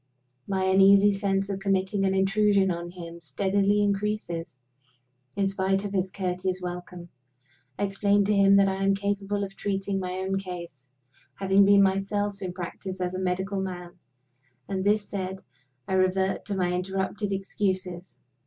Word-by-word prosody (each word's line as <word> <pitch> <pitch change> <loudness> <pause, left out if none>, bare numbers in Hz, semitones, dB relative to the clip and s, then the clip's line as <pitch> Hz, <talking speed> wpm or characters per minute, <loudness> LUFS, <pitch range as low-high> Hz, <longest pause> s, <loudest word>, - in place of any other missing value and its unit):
My 190 -1 0
uneasy 195 +2 +6
sense 195 -1 0
of 195 -1 -3
committing 195 0 0
an 190 0 +1
intrusion 195 0 +3
on 170 0 -4
him 170 -1 -9
steadily 200 +6 +1
increases, 200 -7 -2 0.8
in 200 -1 +1
spite 195 0 0
of 200 - -4
his 190 -1 0
courteous 185 -1 -2
welcome. 180 0 -7 0.7
I - - -1
explain 200 0 +2
to 210 - +2
him 200 -1 +5
that 200 0 +5
I 195 0 -1
am 195 0 +3
capable 200 0 -2
of 195 0 -6
treating 195 0 -2
my 180 -1 -3
own 190 +1 -1
case, 170 -8 -8 0.5
having 195 +1 +4
been 200 0 +6
myself 195 +1 0
in 185 -2 -3
practice 185 +1 -6
as 180 0 -2
a 185 - -3
medical 190 +2 -1
man; 180 -2 -5 0.8
and 190 -1 -2
this 205 +1 +2
said, 190 -1 -5 0.4
I - - -2
revert 190 +1 +1
to 200 -1 -3
my 180 -1 +1
interrupted 190 +3 -2
excuses. 185 -2 -3
195 Hz, 155 wpm, -26 LUFS, 185-200 Hz, 0.8 s, uneasy